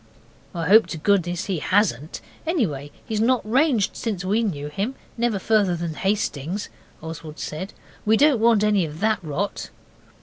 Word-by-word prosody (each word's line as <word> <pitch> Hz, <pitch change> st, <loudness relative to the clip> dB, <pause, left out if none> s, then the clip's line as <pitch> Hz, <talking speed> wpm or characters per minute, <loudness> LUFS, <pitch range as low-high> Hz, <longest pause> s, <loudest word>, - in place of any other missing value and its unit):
'I 165 Hz, -1 st, -2 dB
hope 220 Hz, +4 st, +7 dB
to 165 Hz, -, -5 dB
goodness 180 Hz, +1 st, +1 dB
he 185 Hz, -5 st, -2 dB
hasn't 165 Hz, -, 0 dB, 0.3 s
anyway, 165 Hz, -, -1 dB, 0.2 s
he's 215 Hz, -1 st, -1 dB
not 245 Hz, -1 st, +2 dB
ranged 250 Hz, -3 st, +2 dB
since 200 Hz, -5 st, -3 dB
we 210 Hz, +5 st, +2 dB
knew 150 Hz, -10 st, -2 dB
him 200 Hz, -, -3 dB, 0.2 s
never 235 Hz, -3 st, 0 dB
further 200 Hz, -2 st, +2 dB
than 170 Hz, -1 st, -3 dB
Hastings,' 190 Hz, -1 st, -2 dB, 0.3 s
Oswald 160 Hz, -1 st, -7 dB
said. 175 Hz, +6 st, -5 dB, 0.3 s
'We 220 Hz, +1 st, +4 dB
don't 285 Hz, -2 st, +4 dB
want 225 Hz, -2 st, +4 dB
any 210 Hz, -3 st, +3 dB
of 155 Hz, 0 st, -6 dB
that 220 Hz, 0 st, +2 dB
rot. 170 Hz, +6 st, -3 dB
200 Hz, 160 wpm, -23 LUFS, 165-220 Hz, 0.3 s, hope